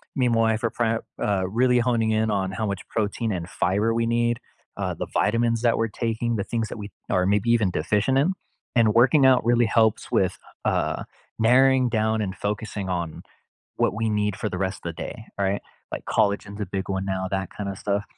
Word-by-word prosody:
me 130 Hz, -3 st, +2 dB
and 120 Hz, -, +2 dB
my 115 Hz, -, +3 dB
wife 110 Hz, +1 st, +1 dB
are 115 Hz, -, +2 dB
pre 115 Hz, -1 st, 0 dB, 0.2 s
uh, 100 Hz, -2 st, +1 dB
really 125 Hz, +3 st, +3 dB
homing 115 Hz, -2 st, +1 dB
in 110 Hz, 0 st, +1 dB
on 95 Hz, -2 st, 0 dB
how 110 Hz, +3 st, -2 dB
much 100 Hz, -2 st, -4 dB
protein 110 Hz, +1 st, -1 dB
and 85 Hz, -1 st, -4 dB
fiber 105 Hz, +5 st, +1 dB
we 115 Hz, 0 st, +1 dB
need, 120 Hz, 0 st, +1 dB, 0.4 s
uh, -, -, -2 dB
the -, -, -5 dB
vitamins 115 Hz, +1 st, +2 dB
that 120 Hz, -1 st, +3 dB
we're 115 Hz, -, +1 dB
taking, 115 Hz, +1 st, -1 dB
the 100 Hz, -, -2 dB
things 115 Hz, -2 st, -2 dB
that -, -, -6 dB
we 105 Hz, -1 st, -7 dB, 0.2 s
are 90 Hz, -, +2 dB
maybe 105 Hz, +4 st, +1 dB
even 110 Hz, -5 st, +3 dB
deficient 105 Hz, -, +1 dB
in, 155 Hz, +8 st, +3 dB, 0.4 s
and 110 Hz, -3 st, +4 dB
working 135 Hz, +4 st, +5 dB
out 130 Hz, -3 st, +5 dB
really 120 Hz, 0 st, +4 dB
helps 110 Hz, -1 st, +2 dB
with, -, -, +1 dB, 0.3 s
uh, -, -, 0 dB, 0.4 s
narrowing 130 Hz, +2 st, +5 dB
down 110 Hz, -1 st, +1 dB
and 95 Hz, -2 st, -3 dB
focusing 105 Hz, -1 st, -3 dB
on 85 Hz, -3 st, -3 dB, 0.5 s
what -, -, +2 dB
we 110 Hz, 0 st, -1 dB
need 105 Hz, -1 st, 0 dB
for 105 Hz, 0 st, -3 dB
the 95 Hz, -, -4 dB
rest 95 Hz, +1 st, -1 dB
of 85 Hz, -1 st, -4 dB
the -, -, -7 dB
day, 110 Hz, -3 st, -8 dB
right? 100 Hz, 0 st, 0 dB, 0.3 s
Like -, -, -5 dB
collagen 100 Hz, 0 st, 0 dB
is 105 Hz, -, -6 dB
a 105 Hz, -, -1 dB
big 95 Hz, +1 st, -4 dB
one 95 Hz, 0 st, -1 dB
now, 95 Hz, -1 st, -2 dB
that 95 Hz, -1 st, -2 dB
kind 100 Hz, -1 st, -5 dB
of 95 Hz, -, -5 dB
stuff. 100 Hz, +1 st, -1 dB
110 Hz, 220 wpm, -24 LUFS, 100-115 Hz, 0.5 s, working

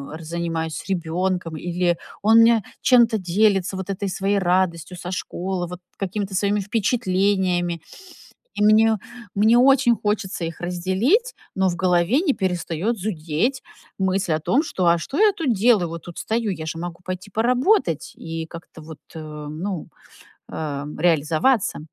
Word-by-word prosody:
р 165 Hz, -, -9 dB
занимаюсь 165 Hz, -1 st, -3 dB
с -, -, -9 dB
ребёнком, 175 Hz, -1 st, -1 dB
или 175 Hz, +1 st, 0 dB, 0.2 s
он 220 Hz, +2 st, +5 dB
мне 230 Hz, -1 st, +5 dB, 0.2 s
чем-то 235 Hz, -3 st, +5 dB
делится, 195 Hz, 0 st, +1 dB
вот 190 Hz, +1 st, -6 dB
этой 195 Hz, +1 st, -2 dB
своей 195 Hz, +2 st, 0 dB
радостью 180 Hz, -1 st, 0 dB
со 180 Hz, +1 st, -6 dB
школы, 185 Hz, 0 st, -3 dB
вот 180 Hz, +1 st, -9 dB, 0.2 s
какими-то 195 Hz, 0 st, -3 dB
своими 200 Hz, +1 st, +1 dB
впечатлениями. 190 Hz, -5 st, 0 dB, 0.7 s
И 210 Hz, -, -1 dB
мне, 220 Hz, +1 st, +5 dB, 0.4 s
мне 220 Hz, +3 st, +5 dB
очень 265 Hz, -2 st, +5 dB
хочется 205 Hz, -4 st, -2 dB
их 165 Hz, 0 st, -6 dB
разделить, 190 Hz, -, +1 dB, 0.2 s
но 190 Hz, 0 st, +2 dB
в 175 Hz, -, -2 dB
голове 180 Hz, -, +2 dB
не 285 Hz, -, +3 dB
перестаёт 185 Hz, +3 st, -1 dB
зудеть 185 Hz, -, -1 dB, 0.4 s
мысль 190 Hz, -2 st, +1 dB
о -, -, -4 dB
том, 235 Hz, -, +2 dB
что: 185 Hz, -, -2 dB
"А 170 Hz, 0 st, +5 dB
что 270 Hz, -, -6 dB
я 425 Hz, -1 st, +6 dB
тут 325 Hz, -, -1 dB
делаю? 210 Hz, -4 st, +3 dB
Вот 170 Hz, 0 st, -7 dB
тут 175 Hz, -, -10 dB
стою, 225 Hz, -1 st, -1 dB
я 160 Hz, -4 st, -5 dB
же 160 Hz, +1 st, -4 dB
могу 170 Hz, 0 st, -6 dB
пойти 185 Hz, +2 st, -6 dB
поработать 245 Hz, -, +1 dB
и 165 Hz, 0 st, -5 dB
как-то 165 Hz, -1 st, -11 dB
вот, 155 Hz, -1 st, -10 dB, 0.2 s
э, 160 Hz, -, -6 dB, 0.3 s
ну, 170 Hz, +3 st, -5 dB, 0.6 s
эм, 150 Hz, -1 st, -5 dB
реализоваться". 165 Hz, -, +2 dB
185 Hz, 155 wpm, -22 LUFS, 170-215 Hz, 0.7 s, я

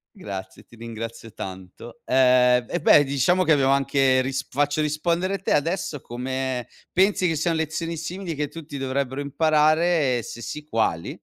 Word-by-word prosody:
Grazie, 95 Hz, -, -8 dB
ti -, -, -19 dB
ringrazio 115 Hz, -1 st, -8 dB
tanto. 95 Hz, +5 st, -9 dB
Ehm, 125 Hz, -1 st, +4 dB
eh 175 Hz, -, -1 dB
beh, 145 Hz, -, +6 dB
diciamo 140 Hz, +7 st, +2 dB
che 165 Hz, -, +1 dB
abbiamo 135 Hz, -2 st, +3 dB
anche 135 Hz, -1 st, +3 dB
risp 135 Hz, +1 st, -4 dB
faccio 145 Hz, +2 st, +1 dB
rispondere 170 Hz, +6 st, 0 dB
te -, -, 0 dB
adesso: 155 Hz, -2 st, -1 dB
come 130 Hz, 0 st, -4 dB, 0.2 s
pensi 190 Hz, -1 st, +2 dB
che 165 Hz, -, 0 dB
sian 165 Hz, +2 st, 0 dB
lezioni 160 Hz, +1 st, -3 dB
simili 170 Hz, +2 st, -5 dB
che 150 Hz, 0 st, -2 dB
tutti 150 Hz, -2 st, -9 dB
dovrebbero 135 Hz, +1 st, -2 dB
imparare 155 Hz, -1 st, +2 dB
e -, -, -4 dB
se 120 Hz, -, -9 dB
sì, 150 Hz, 0 st, -6 dB
quali? 110 Hz, -, -1 dB
140 Hz, 160 wpm, -24 LUFS, 125-160 Hz, 0.2 s, beh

